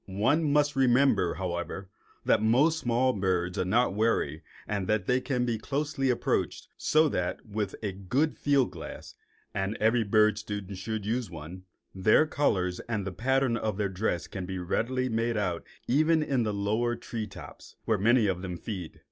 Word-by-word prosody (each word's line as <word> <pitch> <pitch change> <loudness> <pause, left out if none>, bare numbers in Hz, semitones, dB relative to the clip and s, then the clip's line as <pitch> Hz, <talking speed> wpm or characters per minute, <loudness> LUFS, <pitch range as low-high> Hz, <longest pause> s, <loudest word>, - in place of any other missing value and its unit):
One 140 +11 +1
must 145 0 +2
remember, 130 -7 +3
however, 90 +1 -4 0.4
that - - +3
most 140 +9 +3
small 125 +1 +2
birds 95 -2 -1
are - - +2
not 115 +3 +2
wary 100 -8 0 0.3
and 100 -3 -2
that 110 0 +1
they 125 0 +2
may 135 - +1
be 120 -2 0
closely 140 +1 -1
approached, 125 - -1
so 155 +1 +3
that, 90 -8 -2
with 105 -2 -3
a 105 - -1
good 125 - 0
field 140 -8 +2
glass 85 -3 -9 0.4
(and 95 +2 -2
every 110 +2 +3
bird 110 +1 +3
student 105 -3 -6
should 110 +1 -4
use 115 +2 -1
one) 85 +3 -9 0.3
their 105 +10 +4
colors 90 -12 0
and 105 -4 -1
the 95 - -3
pattern 130 +4 +1
of 110 -3 -2
their 105 -2 0
dress 90 -3 -1
can 95 -2 -6 0.2
readily 130 +7 0
be 120 - -4
made 115 0 0
out 90 -5 -1 0.2
even 155 +4 +3
in 135 -4 0
the 110 -2 0
lower 110 +4 0
tree 115 -2 -5
tops, 100 - -12
where 110 -3 +1
many 115 +3 +4
of 95 -3 0
them 90 -2 -5
feed. 90 -4 -7
110 Hz, 175 wpm, -28 LUFS, 95-125 Hz, 0.4 s, their